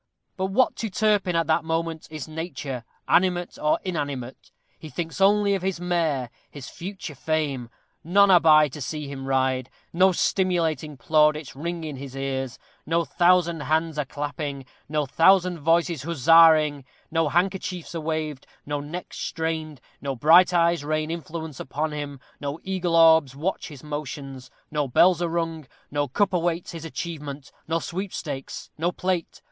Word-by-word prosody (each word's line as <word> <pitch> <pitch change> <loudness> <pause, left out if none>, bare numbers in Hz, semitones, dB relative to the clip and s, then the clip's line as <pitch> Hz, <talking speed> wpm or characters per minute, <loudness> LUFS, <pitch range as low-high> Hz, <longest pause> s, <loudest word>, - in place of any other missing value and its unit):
But 190 0 -1
what 220 +7 +2
to 225 - -3
Turpin, 205 -3 +1
at 165 0 +2
that 160 +1 +2
moment, 165 0 -2
is 155 -3 -6
nature, 155 -6 -5 0.2
animate 180 -1 +2
or 150 0 +3
inanimate? 145 -8 -4 0.3
He 155 - -9
thinks 165 +3 -5
only 200 +1 +4
of 195 - -1
his 190 -2 -2
mare 160 -8 -1 0.2
his 140 -3 -9
future 185 -3 -7
fame. 140 -4 -2 0.3
None 200 +4 +5
are 180 - +8
by 155 -2 +6
to 145 +3 -9
see 150 +2 -4
him 135 -1 -7
ride; 130 -1 +1 0.2
no 185 +3 +5
stimulating 170 -5 0
plaudits 150 +3 +2
ring 170 +3 -4
in 150 -3 -5
his 135 0 -8
ears; 135 -2 -3 0.3
no 165 +1 0
thousand 175 -2 +3
hands 155 +2 0
are 150 - 0
clapping; 145 -1 -5 0.2
no 150 -1 0
thousand 180 +4 +4
voices 165 0 +2
huzzaing; 155 -1 +5 0.3
no 165 -2 +1
handkerchiefs 180 0 -1
are 165 - -3
waved; 155 -3 -3 0.2
no 145 0 -2
necks 160 +5 -7
strained; 160 -3 -3 0.2
no 140 -1 -3
bright 165 +9 +6
eyes 170 -3 +2
rain 155 +1 -1
influence 160 -3 -6
upon 150 +4 -3
him; 145 -2 -5 0.2
no 145 +2 -4
eagle 185 -3 -1
orbs 160 -5 +6
watch 170 +7 -2
his 145 -5 -11
motions; 140 -3 -6 0.2
no 150 -2 0
bells 175 +7 +4
are 170 - 0
rung; 165 -3 -3 0.2
no 145 0 0
cup 195 +9 +1
awaits 170 -1 -1
his 165 -1 -8
achievement; 150 -4 -6 0.2
no 165 +1 +1
sweepstakes 165 -6 -5
no 170 +2 +1
plate. 180 -1 -2
160 Hz, 155 wpm, -25 LUFS, 145-175 Hz, 0.3 s, are